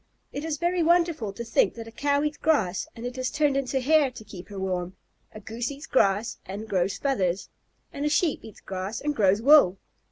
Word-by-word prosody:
It 285 Hz, -, -4 dB
is 315 Hz, -2 st, -2 dB
very 345 Hz, +3 st, 0 dB
wonderful 335 Hz, -, +2 dB
to 215 Hz, +4 st, -7 dB
think 230 Hz, -, +2 dB
that 230 Hz, -1 st, -8 dB
a -, -, -10 dB
Cow 285 Hz, +3 st, 0 dB
eats 300 Hz, 0 st, -1 dB
grass 210 Hz, -, +1 dB
and 235 Hz, 0 st, -8 dB
it 250 Hz, +1 st, -5 dB
is 255 Hz, 0 st, -1 dB
turned 295 Hz, -2 st, +1 dB
into 270 Hz, -1 st, 0 dB
hair 290 Hz, +1 st, +3 dB
to 230 Hz, -3 st, -11 dB
keep 195 Hz, -3 st, -11 dB
her 200 Hz, -, -8 dB
warm, 185 Hz, -1 st, -3 dB, 0.4 s
a 215 Hz, -, -10 dB
Goose 230 Hz, +3 st, -4 dB
eats 285 Hz, +2 st, -8 dB
grass 210 Hz, -2 st, +1 dB
and 205 Hz, +4 st, -7 dB
grows 190 Hz, 0 st, 0 dB
feathers, 195 Hz, -10 st, -1 dB, 0.4 s
and 280 Hz, -, -4 dB
a 300 Hz, -, +1 dB
Sheep 305 Hz, 0 st, +1 dB
eats 220 Hz, -, -12 dB
grass 190 Hz, +3 st, -5 dB
and 295 Hz, 0 st, -2 dB
grows 200 Hz, +1 st, +3 dB
wool. 275 Hz, -10 st, +6 dB
235 Hz, 215 wpm, -26 LUFS, 195-290 Hz, 0.4 s, wool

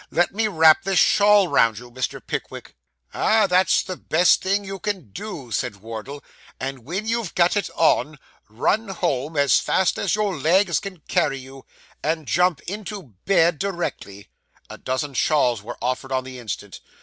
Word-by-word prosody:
'Let 175 Hz, +2 st, +1 dB
me 220 Hz, +2 st, +1 dB
wrap 160 Hz, -5 st, +5 dB
this 195 Hz, -1 st, -1 dB
shawl 205 Hz, 0 st, +5 dB
round 115 Hz, -, +3 dB
you, 120 Hz, +1 st, -11 dB
Mr. 130 Hz, +1 st, -3 dB
Pickwick.' -, -, -6 dB, 0.4 s
'Ah, 220 Hz, -1 st, +3 dB
that's 185 Hz, 0 st, +3 dB
the 185 Hz, -, -5 dB
best 175 Hz, +3 st, +3 dB
thing 200 Hz, +2 st, 0 dB
you 195 Hz, 0 st, -6 dB
can 190 Hz, -, -4 dB
do,' 145 Hz, -, -8 dB
said 115 Hz, +1 st, -2 dB
Wardle; 115 Hz, +7 st, -8 dB, 0.4 s
'and 130 Hz, -3 st, -5 dB
when 185 Hz, +8 st, -4 dB
you've 230 Hz, -4 st, -2 dB
got 175 Hz, +2 st, +3 dB
it 205 Hz, -, -1 dB
on, 155 Hz, -2 st, +2 dB, 0.3 s
run 200 Hz, -, 0 dB
home 150 Hz, -5 st, -2 dB
as 140 Hz, -2 st, +4 dB
fast 190 Hz, -, +1 dB
as -, -, +1 dB
your 210 Hz, -3 st, -1 dB
legs 175 Hz, +2 st, +2 dB
can 190 Hz, -5 st, -9 dB
carry 135 Hz, -, 0 dB
you, 135 Hz, 0 st, -12 dB, 0.3 s
and 160 Hz, 0 st, -2 dB
jump 180 Hz, -3 st, +2 dB
into 195 Hz, -, -7 dB
bed 170 Hz, -5 st, +3 dB
directly.' 170 Hz, -, -4 dB, 0.4 s
A -, -, -10 dB
dozen 130 Hz, +2 st, -3 dB
shawls 125 Hz, -5 st, +2 dB
were 120 Hz, +4 st, -8 dB
offered 130 Hz, +1 st, -2 dB
on 130 Hz, -1 st, 0 dB
the 130 Hz, -1 st, -9 dB
instant. 105 Hz, -4 st, -7 dB
160 Hz, 170 wpm, -22 LUFS, 130-195 Hz, 0.4 s, wrap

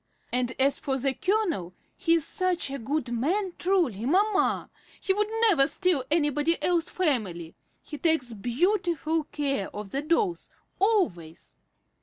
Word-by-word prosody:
"And 250 Hz, 0 st, 0 dB
as 275 Hz, +1 st, +3 dB
for 270 Hz, -1 st, -1 dB
the 270 Hz, +1 st, +1 dB
colonel, 340 Hz, -, -1 dB, 0.2 s
he 335 Hz, -3 st, +2 dB
is 330 Hz, -, 0 dB
such 365 Hz, -7 st, -1 dB
a 275 Hz, -, -4 dB
good 265 Hz, +1 st, -2 dB
man, 355 Hz, -, 0 dB
truly, 325 Hz, -, +1 dB
mamma! 395 Hz, +5 st, +1 dB, 0.3 s
He 385 Hz, -, +1 dB
would 420 Hz, +1 st, 0 dB, 0.2 s
never 290 Hz, -10 st, +4 dB
steal 345 Hz, -2 st, +1 dB
anybody 295 Hz, +1 st, +1 dB
else's 345 Hz, -1 st, +1 dB
family! 210 Hz, -, -1 dB, 0.3 s
He 300 Hz, -, -8 dB
takes 320 Hz, -8 st, +1 dB
beau 245 Hz, -, +1 dB
tiful 325 Hz, -3 st, -2 dB
care 275 Hz, -10 st, -2 dB
of 205 Hz, -1 st, -8 dB
the 275 Hz, -, -1 dB
dolls, 340 Hz, +4 st, 0 dB, 0.3 s
always." 230 Hz, -, 0 dB
305 Hz, 145 wpm, -27 LUFS, 250-365 Hz, 0.3 s, never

